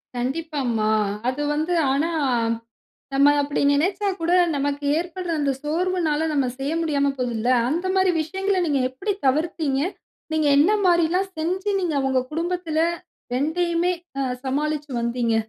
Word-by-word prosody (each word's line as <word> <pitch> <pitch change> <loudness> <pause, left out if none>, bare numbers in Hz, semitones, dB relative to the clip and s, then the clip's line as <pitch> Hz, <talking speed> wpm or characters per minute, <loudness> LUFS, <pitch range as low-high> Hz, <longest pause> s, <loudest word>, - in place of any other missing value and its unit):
கண்டிப்பா 295 +5 -2 0.2
மா. 215 0 +1 0.4
அது 260 +3 -3
வந்து. 310 +4 -1 0.2
ஆனா, 290 +5 +1 1.1
நம்ம 280 +1 +5
அப்படி 285 0 -2
நினச்சா 380 +7 +1
கூட 330 +1 0 0.2
நமக்கு 285 +1 -2
ஏற்படுற 350 +1 -4
அந்த 285 -2 +1
சோர்வுனால 320 0 0
நம்ம 280 -3 +1
செய்ய 275 +3 -2
முடியாம 285 -4 +1
போதுல்ல. 240 -2 -1 0.2
அந்த 335 +7 -1
மாதிரி 375 -1 +4
விஷயங்கள 385 +4 -1
நீங்க 285 -4 +1
எப்படி 265 +11 -2
தவிர்த்தீங்க? 300 0 +1 0.5
நீங்க 310 -1 +1
என்ன 325 +9 +5
மாரி 345 -2 +4
எல்லாம் 380 +2 0
செஞ்சு 370 +6 -1
நீங்க 345 -4 -1
உங்க 260 -1 +2
குடும்பத்துல 335 0 -2 0.5
2யுமே 340 +6 +1 0.3
அ - - +1 0.2
சமாளிச்சு 295 +2 -2
வந்தீங்க? 235 -1 0
310 Hz, 135 wpm, -23 LUFS, 280-350 Hz, 1.1 s, நம்ம